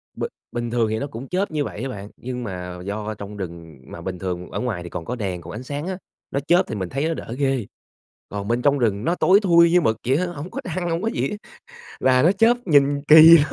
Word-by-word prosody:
B - - -5 0.3
bình 120 0 -3
thường 115 -2 +1
thì 110 - -1
nó 140 - -3
cũng 130 0 -8
chớp 185 +2 -1
như 150 -2 0
vậy 115 - -6
á 135 - -3
bạn, 100 -3 -7
nhưng 125 0 -5
mà 90 -4 -6
do 105 +2 -3
trong 100 +1 -8
rừng 85 -5 -8
mà 85 - -8
bình 90 0 -5
thường 90 -1 -4
ở - - -3
ngoài 110 -9 -3
thì 85 - -8
còn 80 - -6
có 125 - -3
đèn, 95 -6 -3
còn 85 +1 -9
ánh 110 +4 -7
sáng 145 +5 -5
á, 190 - -3 0.3
nó 140 - 0
chớp 175 +2 +5
thì - - -4
mình 95 -3 -3
thấy 140 +4 -1
nó 165 - 0
đỡ 125 -6 -6
ghê. 135 -6 0 0.6
Còn 100 0 -5
bên 120 +2 0
trong 145 +1 +3
rừng 110 -2 0
nó 170 +2 +1
tối 190 +3 +5
thui 170 -4 +5
như 180 0 +5
mực 110 -5 +1
vậy 135 +3 +3
á, 180 - 0
hổng 175 +1 -7
có 275 - -5
trăng 185 -7 -3
hổng 165 +2 -1
có 220 - -1
gì - - -1
á, 210 - -5 0.6
và 130 -1 +4
nó 170 - +5
chớp 225 +4 +4
nhìn 145 -3 +3
kỳ 160 +2 +10
lắm. 145 -1 0
125 Hz, 270 wpm, -22 LUFS, 100-165 Hz, 0.6 s, kỳ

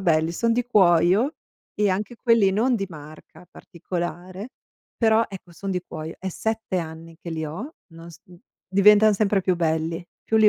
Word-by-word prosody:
belli, 165 -2 +2
son 230 +6 +1
di 245 0 0
cuoio, 190 - +3 0.4
e 210 -1 +2
anche 210 +5 -3
quelli 230 -5 +3
non 240 +5 +2
di 195 -2 -3
marca 155 +1 -13
particolare, 180 +4 -6 0.5
però, 220 -1 +4
ecco 185 -3 -11
son 195 +4 -6
di 180 -1 -2
cuoio, 155 +1 -7
è 190 - -4
7 220 -2 -2
anni 165 0 -8
che 170 - -9
li 160 -1 -3
ho, 210 - -7
non 165 0 -12
s 165 +1 -15
mhmm, 175 -1 -17 0.3
diventan 210 +3 +6
sempre 200 -1 +2
più 185 - +2
belli. 165 0 -1 0.2
Più 225 - +1
li 215 -1 +7
185 Hz, 175 wpm, -24 LUFS, 165-215 Hz, 0.5 s, li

